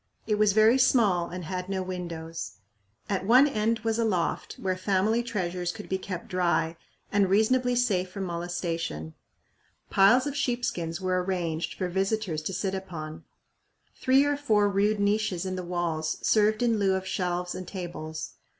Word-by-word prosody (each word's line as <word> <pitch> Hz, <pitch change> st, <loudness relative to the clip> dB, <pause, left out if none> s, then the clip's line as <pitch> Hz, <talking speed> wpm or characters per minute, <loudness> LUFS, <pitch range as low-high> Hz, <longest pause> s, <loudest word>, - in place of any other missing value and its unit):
It 210 Hz, -1 st, 0 dB
was 210 Hz, -2 st, +4 dB
very 220 Hz, +4 st, +5 dB
small 210 Hz, -9 st, +3 dB
and 180 Hz, -1 st, -6 dB
had 185 Hz, +1 st, -4 dB
no 190 Hz, -1 st, -1 dB
windows. 170 Hz, -3 st, -5 dB, 0.5 s
At 195 Hz, -2 st, -1 dB
one 250 Hz, +8 st, +6 dB
end 225 Hz, -3 st, 0 dB
was 225 Hz, 0 st, 0 dB
a -, -, +3 dB
loft 185 Hz, -7 st, -1 dB
where 185 Hz, -1 st, -2 dB
family 200 Hz, +4 st, +1 dB
treasures 180 Hz, -6 st, -2 dB
could 210 Hz, +2 st, -9 dB
be 190 Hz, -, -1 dB
kept 185 Hz, -2 st, -6 dB
dry 170 Hz, -2 st, +1 dB, 0.4 s
and 200 Hz, -2 st, +3 dB
reasonably 245 Hz, +5 st, +3 dB
safe 200 Hz, -7 st, +1 dB
from 195 Hz, +1 st, -5 dB
molestation. 170 Hz, -, -3 dB, 0.8 s
Piles 205 Hz, +7 st, +5 dB
of 285 Hz, -1 st, -3 dB
sheep 245 Hz, -3 st, 0 dB
skins 165 Hz, 0 st, -3 dB
were 185 Hz, -1 st, 0 dB
arranged 170 Hz, -3 st, -2 dB
for 185 Hz, -, -2 dB
visitors 190 Hz, -2 st, -1 dB
to 155 Hz, -, -3 dB
sit 190 Hz, +1 st, -2 dB
upon. 170 Hz, -5 st, -6 dB, 0.7 s
Three 265 Hz, +1 st, +4 dB
or 290 Hz, 0 st, +1 dB
four 215 Hz, -8 st, +3 dB
rude 205 Hz, +1 st, +1 dB
niches 200 Hz, -3 st, +1 dB
in 185 Hz, 0 st, -2 dB
the 185 Hz, -, -3 dB
walls 175 Hz, -3 st, -2 dB
served 215 Hz, +2 st, +3 dB
in 230 Hz, -3 st, +2 dB
lieu 195 Hz, -1 st, +2 dB
of 190 Hz, 0 st, -3 dB
shelves 180 Hz, -1 st, -2 dB
and 185 Hz, -, -7 dB
tables. 170 Hz, -4 st, -6 dB
190 Hz, 170 wpm, -27 LUFS, 175-215 Hz, 0.8 s, one